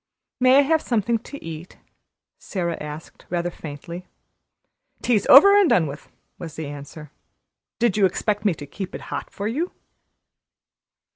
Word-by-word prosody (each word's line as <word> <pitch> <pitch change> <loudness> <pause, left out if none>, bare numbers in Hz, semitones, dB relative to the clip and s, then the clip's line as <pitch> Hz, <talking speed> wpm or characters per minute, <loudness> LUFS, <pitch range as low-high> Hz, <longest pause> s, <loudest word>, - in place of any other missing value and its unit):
"May 255 +1 +6
I - - +8
have 315 +3 +2
something 230 -1 0
to 285 +5 -11
eat?" 165 +2 -8 0.6
Sara 170 -4 -3
asked 150 +1 -9
rather 175 0 -1
faintly. 170 +4 -9 1.0
"Tea's 225 -5 +2
over 400 +10 +9
and 405 -5 +5
done 170 - +4
with," 145 0 -8 0.3
was 165 -4 -8
the 160 - -5
answer. 145 +1 -9 0.7
"Did 235 -4 +1
you 200 -2 +5
expect 205 +3 -2
me 200 -6 +2
to 145 - -9
keep 185 +6 -7
it - - -7
hot - - -4
for 200 - -5
you?" 305 +11 -2
185 Hz, 150 wpm, -23 LUFS, 160-240 Hz, 1.0 s, over